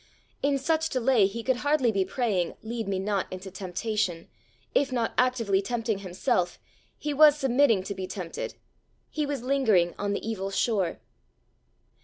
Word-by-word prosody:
In 280 0 +2
such 320 +3 0
delay 250 -5 +3
he 230 +4 -6
could 260 0 +1
hardly 285 -3 +2
be 195 -2 +1
praying 190 -3 -1
"Lead 225 -1 -4
me 195 -1 -1
not 195 0 -1
into 185 +1 -7
temptation:" 190 -1 -2 0.4
if 275 -1 +2
not 235 -3 0
actively 230 -6 +2
tempting 220 -1 -2
himself, 185 0 -1 0.4
he 295 - -3
was 300 0 +7
submitting 255 -6 +3
to 200 - -4
be 190 -1 -5
tempted; 185 -3 -5 0.6
he 305 -2 -1
was 280 -4 -3
lingering 225 -11 +3
on 205 0 -1
the 200 - -4
evil 195 -3 -2
shore. 195 -2 0
220 Hz, 155 wpm, -27 LUFS, 190-260 Hz, 0.6 s, was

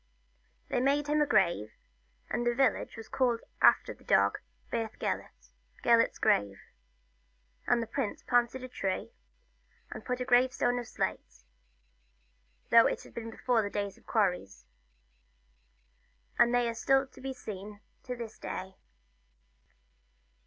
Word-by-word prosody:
They - - +1
made 280 +3 +2
him 300 +1 +1
a 295 - +3
grave, 170 - +2 0.5
and 240 - -2
the 240 0 +1
village 260 -2 +1
was 225 - -9
called 245 -3 +1 0.2
after - - +5
the - - -21
dog, - - +3 0.3
Beth 225 -2 -3
Gelert 60 0 -5 0.3
Gelert's - - +4
Grave; 100 -1 +1 1.1
and 235 - +3
the - - -4
prince 225 -1 -3
planted 245 +1 +1
a - - -5
tree, 195 - -3 0.8
and - - -7
put 250 -1 -2
a 250 - -2
gravestone 245 0 +3
of 240 - -7
slate, 60 - -4 1.3
though 230 0 +8
it - - -3
was - - -15
before 230 +1 -1
the 205 - -3
days 200 -1 -3
of - - -24
quarries. 180 - -1 1.7
And 240 0 +6
they 245 -1 +2
are 230 - -1
to 270 +3 +1
be 270 0 -4
seen 205 -3 -8 0.2
to 250 -1 -5
this 230 -2 -8
day. 190 +1 -6
235 Hz, 135 wpm, -30 LUFS, 200-250 Hz, 1.7 s, though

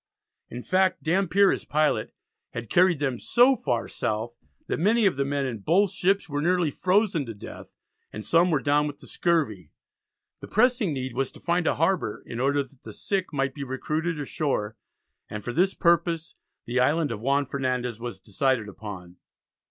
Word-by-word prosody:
In 120 +1 -7
fact 185 0 +1
Dampier 190 +3 +3
as - - -2
pilot 150 -7 0 0.4
had 120 -3 -6
carried 180 -2 +4
them 135 -4 -2
so 250 +3 +4
far 120 - -2
south 110 +2 -3 0.3
that - - -2
many 215 +6 +3
of 190 - +3
the 140 - 0
men 140 0 -1
in 120 -4 -4
both 175 - +2
ships 195 +1 +1
were 145 -1 -2
nearly 175 -1 +2
frozen 185 -1 +1
to 115 - -6
death, 100 - -11 0.4
and 110 - -7
some 170 +2 +4
were 150 -5 +1
down 145 +1 +2
with 145 -1 -6
the - - -15
scurvy. 130 - 0 0.7
The - - -9
pressing 240 -4 +2
need 130 -3 -4
was 130 +1 -1
to - - -13
find 175 0 0
a - - +2
harbour 165 - 0
in 115 - -6
order 140 +2 +2
that 135 -1 -21
the 110 - -10
sick 195 - -2
might 135 -2 -1
be 140 - -6
recruited 155 +5 -2
ashore, 135 -7 -2 0.5
and 105 -1 -6
for 120 - -4
this 185 +6 +2
purpose 170 -1 +1 0.3
the 125 +2 -1
Island 150 +3 +2
of 110 - -4
Juan 140 +3 +1
Fernandez 125 -4 -2
was 115 -5 -6
decided 115 +3 0
upon. 95 -4 -9
145 Hz, 185 wpm, -26 LUFS, 120-175 Hz, 0.7 s, carried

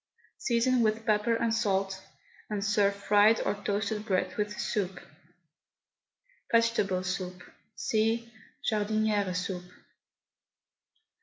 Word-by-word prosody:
Season 245 +1 +2
with 220 0 +1
pepper 215 +2 +2
and 230 0 0
salt, 195 -3 0 0.5
and 205 -2 -2
serve 205 -1 +2
fried 205 +2 +4
or - - 0
toasted 205 +1 -2
bread 185 -3 -1
with 210 0 -1
the - - -8
soup. 190 -3 -2 1.5
VEGETABLE 230 -5 +2
SOUP. 185 -1 -4 0.3
(See 230 +2 0 0.3
JARDINIERE 210 -2 +1
SOUP.) 180 0 -2
210 Hz, 100 wpm, -29 LUFS, 195-225 Hz, 1.5 s, fried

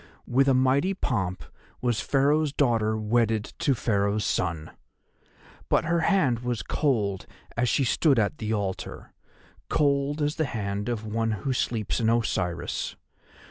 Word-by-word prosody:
With 135 +3 +2
a 135 - +4
mighty 135 +9 +2
pomp 95 - -2 0.4
was 120 -3 0
Pharaoh's 145 +2 +2
daughter 115 -6 +1
wedded 110 0 +1 0.2
to 150 -5 +2
Pharaoh's 105 -2 0
son. 80 -3 -1 1.0
But - - +2
her 170 +1 +1
hand 155 - +2
was 120 -2 -3
cold 105 - 0 0.3
as 120 +1 +1
she 140 - +2
stood 135 +2 +3
at 110 +6 0
the 110 -1 -3
altar, 100 -3 -4 0.6
cold 140 0 +1
as 150 +1 -1
the 160 - +1
hand 105 -3 -3
of 110 -2 -3
one 115 +1 -1 0.2
who 135 - +1
sleeps 115 -4 -1
in 110 -1 +2
Osiris. 90 -7 -1
120 Hz, 140 wpm, -26 LUFS, 105-140 Hz, 1.0 s, a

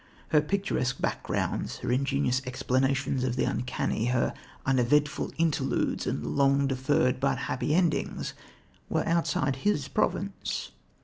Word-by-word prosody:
Her 150 -2 +5
picturesque 155 -7 -1
backgrounds, - - -2
her - - -3
ingenious 135 0 +1
explanations 130 +1 0
of 125 -2 0
the 130 - +1
uncanny, 120 -2 -1
her 120 0 +1 0.3
uneventful 135 +3 +2
interludes 165 -3 0
and - - -2
long 140 0 +3
deferred 130 -1 +1
but 135 0 +1
happy 135 +3 -1
endings 175 -3 0 0.6
were - - 0
outside 165 -4 +1
his 205 -10 0
province. - - -1
135 Hz, 120 wpm, -28 LUFS, 130-150 Hz, 0.6 s, Her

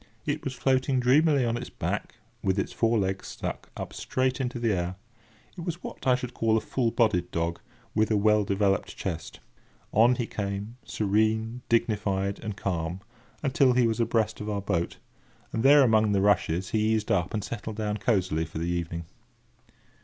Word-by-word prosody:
It - - -2
was 130 - -3
floating 130 0 +2
dreamily 140 +2 +4
on 115 0 0
its - - -6
back, - - -3 0.3
with 95 0 +1
its 100 - -1
four 115 0 +2
legs 95 -1 -1
stuck - - -5
up - - -6
straight 130 +1 -1
into 125 -1 -2
the 115 -2 +1
air. 90 0 -2 0.6
It 180 - -7
was 170 0 -4
what - - -7
I 125 - +6
should 125 -1 -5
call 110 -1 +2
a - - +3
full 120 +2 0
bodied 100 -7 +1
dog, 85 0 -2 0.3
with 110 0 +2
a 110 - +3
well 105 +1 +4
developed 100 0 0
chest. 85 -4 -5 0.5
On 120 +4 +5
he 120 - -1
came, 100 +1 -4
serene, 110 +3 0
dignified, 105 -4 +1
and 105 -2 -5
calm, 90 -2 -2 0.4
until 135 -2 +4
he 125 -1 +4
was 115 0 0
abreast 115 -2 +1
of 105 - -4
our 105 -1 -1
boat, 85 -4 -1 0.6
and 110 - 0
there, 140 +3 +7
among 110 -3 +4
the 100 - +2
rushes, 95 -3 +2
he 110 0 +2
eased 110 -1 -2
up, 90 -2 +1
and 105 -2 -2
settled 110 0 -5
down 105 -1 -2
cosily 95 -7 +1
for 80 - -8
the 85 +2 -2
evening. 85 -1 -3
110 Hz, 185 wpm, -27 LUFS, 95-120 Hz, 0.6 s, there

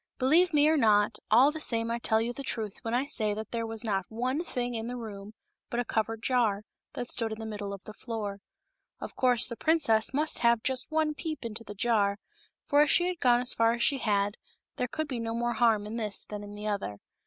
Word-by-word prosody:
Believe 325 +8 +4
me 295 -1 +4
or 315 0 +4
not, 210 -3 +3
all 250 +7 +6
the 315 - -6
same 230 -5 0
I 235 - -1
tell 220 -1 +2
you 235 +2 -1
the 275 - -7
truth 220 -6 -4
when 230 +1 -2
I 255 +3 +1
say 215 -7 -1
that 215 0 -6
there 230 -1 -2
was 225 0 -3
not 195 -4 -1
one 255 +8 -1
thing 245 -7 -2
in 225 0 -3
the 245 - -4
room 210 -2 -8 0.3
but 240 - -2
a 245 - 0
covered 225 0 -2
jar, 225 -5 +1 0.3
that 245 - -4
stood 230 -2 -2
in 220 - -4
the 225 - -6
middle 205 -2 -5
of 200 -1 -8
the 215 - -9
floor. 210 -4 -5 0.6
Of - - -7
course 245 -2 +4
the 235 - -5
princess 280 -8 +2
must 300 +3 0
have 235 -1 +3
just 260 -1 +1
one 310 -1 +1
peep 310 -3 -5
into 230 0 -6
the 205 -1 -9
jar, 205 -2 +2 0.5
for 290 +1 +4
as 300 - +4
she 350 - +4
had 360 -2 -4
gone 245 -1 +4
as 250 - +1
far 230 0 +3
as 235 - -1
she 275 - +2
had, 205 -3 0 0.4
there 250 - -1
could 310 +5 -3
be 255 -4 -4
no 230 0 -3
more 240 0 0
harm 225 -4 +3
in 215 +2 -5
this 215 -3 -2
than 210 -1 -6
in 205 0 -9
the 210 +1 -7
other. 200 - -2
230 Hz, 245 wpm, -29 LUFS, 215-255 Hz, 0.6 s, all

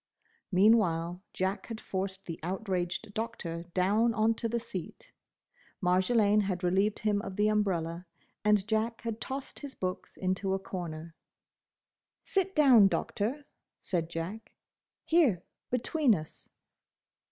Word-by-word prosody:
Meanwhile 180 -4 +3
Jack 190 +1 -2
had 225 -2 -6
forced 190 0 -4
the 165 -2 -6
outraged 185 +1 -2
Doctor 205 -7 -4
down 210 +5 +3
on 220 +1 +3
to 230 0 -3
the 235 +1 0
seat, 225 -7 -8 0.7
Marjolaine 200 +3 +3
had 190 -2 -2
relieved 195 +4 +2
him 210 -1 +1
of 195 -3 -6
the 210 +1 +3
umbrella, 180 -5 0 0.4
and 210 -1 +3
Jack 225 +1 0
had 230 -1 -4
tossed 270 0 -5
his 285 -2 -8
books 185 0 -4
into 190 +1 0
a - - 0
corner. 170 -4 -6 1.1
"Sit 385 0 0
down, 255 -10 +7
Doctor," 240 +8 -2 0.3
said 165 -3 -2
Jack, 170 +7 -6 0.5
"here, 275 - +3 0.3
between 250 0 +2
us." 155 -3 -8
200 Hz, 125 wpm, -30 LUFS, 180-225 Hz, 1.1 s, down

